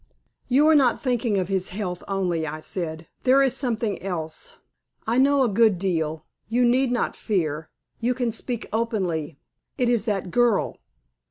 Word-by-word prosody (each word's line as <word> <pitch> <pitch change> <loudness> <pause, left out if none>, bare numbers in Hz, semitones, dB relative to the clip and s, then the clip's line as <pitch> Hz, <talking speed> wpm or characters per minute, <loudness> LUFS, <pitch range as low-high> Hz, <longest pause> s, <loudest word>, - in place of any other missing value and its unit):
"You 275 +4 +4
are 315 - +6
not 270 -5 +4
thinking 240 -5 +1
of 185 -2 0
his 190 -1 -1
health 180 -2 -4
only," 180 -5 -1
I 155 +1 -5
said; 160 -1 -5
"there 270 +1 +5
is 265 -1 +2
something 230 -6 -1
else. 160 -4 -4 0.5
I 235 +3 +2
know 280 0 +4
a - - +3
good 215 -2 +3
deal, 160 -4 -2 0.2
you 245 +2 +3
need 250 +1 +3
not 245 - 0
fear. 160 -7 -2 0.3
You 245 +2 0
can 245 -2 0
speak 240 +1 -2
openly. 180 -10 -1 0.4
It 250 -3 +2
is 235 -3 +1
that 195 -5 -2
girl." 240 -2 +2
215 Hz, 165 wpm, -24 LUFS, 175-245 Hz, 0.5 s, are